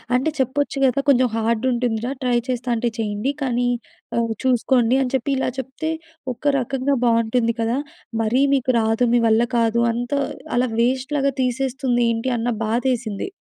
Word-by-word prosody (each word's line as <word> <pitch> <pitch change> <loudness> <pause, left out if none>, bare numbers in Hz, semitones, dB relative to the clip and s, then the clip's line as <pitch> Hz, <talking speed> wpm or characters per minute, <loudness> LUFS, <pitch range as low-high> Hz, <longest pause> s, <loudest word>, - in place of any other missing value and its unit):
అంటే 265 +5 +2
చెప్పొచ్చు 275 +2 0
కద, 255 -2 +3
కొంచెం 255 -2 +5
హార్డ్ 230 +2 0
ఉంటుందిరా. 240 0 -1
ట్రై 245 -1 +2
చేస్తాంటే 240 -1 0
చేయండి 215 +5 -1
కానీ 245 -2 0 0.5
ఆహ్, 230 -1 +1
చూసుకోండి. 250 -1 +3
అని 255 -2 -1
చెప్పి 260 +2 -1
ఇలా 265 - 0
చెప్తే, 265 +5 -4 0.4
ఒక 245 - -24 0.2
రకంగా 270 +2 0
బాగుంటుంది 230 0 +2
కదా. 230 +3 0 0.4
మరీ 230 +4 +2
మీకు 260 -1 +1
రాదు. 225 +2 +1
మీ 240 - +5
వల్ల 225 +1 +4
కాదు. 230 0 +2
అంతా 245 +4 -2 0.4
అలా 250 +1 +2
వేస్ట్‌లాగా 270 +3 +1
తీసేస్తుంది 255 0 0
ఏంటి 230 +3 -1
అన్న 235 +2 -1 0.2
బాధేసింది. 235 - -1
245 Hz, 150 wpm, -21 LUFS, 230-260 Hz, 0.5 s, కొంచెం